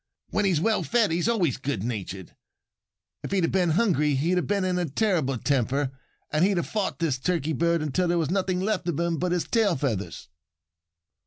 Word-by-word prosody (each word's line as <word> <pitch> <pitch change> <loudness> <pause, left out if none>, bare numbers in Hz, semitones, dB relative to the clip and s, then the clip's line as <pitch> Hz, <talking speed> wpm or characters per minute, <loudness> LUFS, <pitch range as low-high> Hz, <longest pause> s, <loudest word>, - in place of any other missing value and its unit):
When 210 - +1
he's 180 -6 +2
well 220 +6 +1
fed 230 -6 +2
he's 175 +7 +1
always 180 - +1
good 130 -8 -3
natured. 100 -5 -5 0.9
If - - -6
he 195 - +1
had 165 - +1
been 180 -3 +2
hungry 155 -6 +2
he'd 165 +7 +1
have 180 - 0
been 200 -2 0
in 180 -1 0
a 175 - 0
terrible 155 - +1
temper. 135 +2 0 0.4
And 155 +2 +2
he'd 195 0 +3
have 175 - 0
fought 210 -3 -2
this 155 -7 -1
Turkey 160 0 -1
bird 170 +2 +1
until 175 +5 0
there 175 0 +1
was 160 -2 0
nothing 185 -1 0
left 205 -2 -1
of 165 - -2
him 170 -1 0
but 180 0 -1
his 175 -1 +1
tail 220 -6 +2
feathers." 100 - -3
170 Hz, 200 wpm, -26 LUFS, 140-185 Hz, 0.9 s, he'd